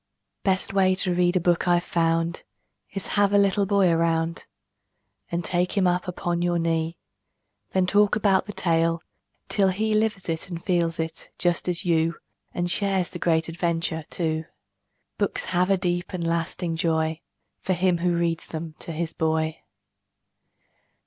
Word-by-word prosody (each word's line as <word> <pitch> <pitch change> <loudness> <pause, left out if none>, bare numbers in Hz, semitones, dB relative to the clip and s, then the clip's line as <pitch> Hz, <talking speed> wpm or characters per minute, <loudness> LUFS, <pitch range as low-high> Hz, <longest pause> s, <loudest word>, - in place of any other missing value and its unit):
Best 190 0 0
way 190 -1 +4
to 185 -1 +1
read 175 +1 +2
a - - +4
book 175 +1 +1
I've 175 0 +3
found 165 0 0 0.5
Is 195 -1 -4
have 205 -1 +2
a - - +6
little 200 0 +3
boy 200 -2 +4
around 165 0 0 0.8
And 170 0 -2
take 180 +2 0
him 195 - +4
up 180 0 +1
upon 175 -1 -2
your 175 0 +1
knee; 165 0 0 0.8
Then 185 -1 +3
talk 205 +2 +3
about 200 -3 +2
the - - -4
tale, 165 -3 +1 0.4
till 195 -2 +2
he 215 +4 0
Lives 215 -3 0
it 165 +2 -3
and 170 -2 -6
feels 170 -3 +1
it, 160 0 -4
just 175 0 0
as 175 0 -1
you, 165 -1 +2 0.4
And 175 0 -1
shares 190 -2 0
the 175 - -8
great 165 -1 +2
adventure, 165 -1 -1
too. 160 -2 -2 0.7
Books - - -1
have 180 +1 +2
a 195 - +4
deep 175 0 -2
and 175 -2 -2
lasting 165 0 -1
joy 160 -1 0 0.4
For 190 - -1
him 180 -1 +2
who 175 0 +1
reads 170 -1 -1
them 160 0 -6
to - - -6
his 165 0 -3
boy. 160 0 0
175 Hz, 160 wpm, -25 LUFS, 165-185 Hz, 0.8 s, a